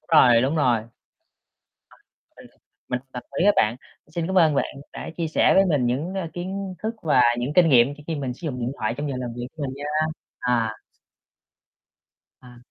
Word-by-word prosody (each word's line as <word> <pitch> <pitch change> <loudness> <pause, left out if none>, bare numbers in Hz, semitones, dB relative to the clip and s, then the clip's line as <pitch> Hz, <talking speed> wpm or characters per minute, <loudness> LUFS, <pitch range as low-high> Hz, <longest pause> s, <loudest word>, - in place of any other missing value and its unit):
Đúng 165 - +1
rồi, 120 -1 +6
đúng 140 +5 0
rồi. 125 -6 +3
À, 110 - -11 1.5
mình - - -13 0.4
mình 125 - -1
đồng 125 - -6 0.2
ý - - +2
với 205 - +6
bạn. 110 +3 +2 0.4
Xin 170 -1 -1
cảm 190 0 +2
ơn 160 -4 +4
bạn 140 - -1 0.2
đã - - -7
chia 165 -2 -2
sẻ - - +3
với 195 - +6
mình 145 -8 +1
những, 150 +10 -2
ơ, 185 -4 -3
kiến 190 +2 -5
thức 220 +2 -2
và 150 -6 +4 0.2
những 125 +4 -2
kinh 175 -2 +6
nghiệm 130 +1 +5
khi 150 - -15
khi 165 - -2
mình 135 -4 -3
sử - - -20
dụng 125 -4 -3
điện 120 +2 -2
thoại 110 +2 -1
trong 145 0 -3
giờ 135 - -3
làm 125 -2 -4
việc 120 0 -4
của 150 - -6
mình 135 -1 -3
nha, 145 +1 -8 0.5
à 115 -3 0 1.7
À. 125 -1 -15
140 Hz, 210 wpm, -24 LUFS, 125-165 Hz, 1.7 s, rồi